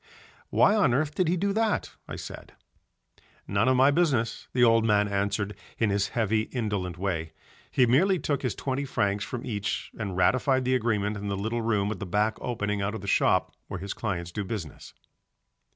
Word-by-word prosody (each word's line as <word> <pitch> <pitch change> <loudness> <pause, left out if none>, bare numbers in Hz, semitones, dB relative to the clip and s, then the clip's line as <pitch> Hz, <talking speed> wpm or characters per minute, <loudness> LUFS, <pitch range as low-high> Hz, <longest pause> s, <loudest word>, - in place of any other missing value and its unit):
"Why 200 - +4
on 195 - +3
earth 150 +2 0
did 185 0 +1
he 175 +3 +2
do 200 +3 0
that?" 220 -1 0 0.2
I - - -6
said. - - -9 0.9
"None 100 +4 +1
of 130 - +4
my 135 +2 +6
business," 140 -8 +1
the 125 - +2
old 115 -1 +5
man 105 -2 +3
answered 100 +1 -1 0.2
in 110 -3 +1
his 100 0 +1
heavy 110 -1 +1
indolent 100 -8 -2
way. 85 -4 -2 0.4
He 130 - +4
merely 175 +11 +4
took 145 -4 -1
his 125 -4 -2
twenty 135 +1 -2
francs 100 -6 0
from 120 +3 -5
each 100 -3 -3
and 100 -4 -3
ratified 130 +7 +2
the 130 - +2
agreement 105 -4 0
in 100 0 -5
the 100 -1 -2
little 110 +4 -2
room 105 -3 +1
at 105 - -5
the 100 - -5
back 105 +4 0
opening 105 -4 -2
out 100 +3 -1
of 110 - -6
the 100 - -8
shop - - +2
where - - -5
his 100 +2 -4
clients 90 -6 -3
do 105 +3 -3
business. 95 -7 -7
110 Hz, 195 wpm, -27 LUFS, 100-130 Hz, 0.9 s, my